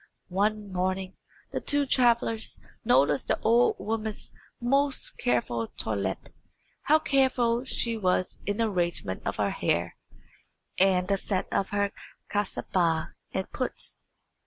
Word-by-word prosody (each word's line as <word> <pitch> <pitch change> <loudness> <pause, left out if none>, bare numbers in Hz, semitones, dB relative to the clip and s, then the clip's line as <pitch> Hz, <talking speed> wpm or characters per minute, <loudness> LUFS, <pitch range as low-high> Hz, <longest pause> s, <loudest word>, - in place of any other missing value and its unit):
One 205 +2 0
morning 185 +1 -1 0.4
the - - -2
two 290 0 +1
travellers 235 -4 +2 0.2
noticed 145 - +3
the - - +1
old 235 +2 +4
woman's 220 -1 -3 0.3
most 275 +3 +2
careful 120 -2 0
toilette: 100 -3 -2 0.5
how 310 - +5
careful 260 -5 +2
she 235 -3 0
was 185 -2 0
in 205 0 0
the 230 -1 +2
arrangement 170 - -1
of - - -1
her - - 0
hair - - -1 0.8
and 185 -1 +4
the 200 - +2
set 190 -1 0
of 195 - +1
her 200 -1 0 0.4
kasabah 180 -5 0 0.2
and 190 - -3
puts. 255 - -3
205 Hz, 125 wpm, -28 LUFS, 180-235 Hz, 0.8 s, how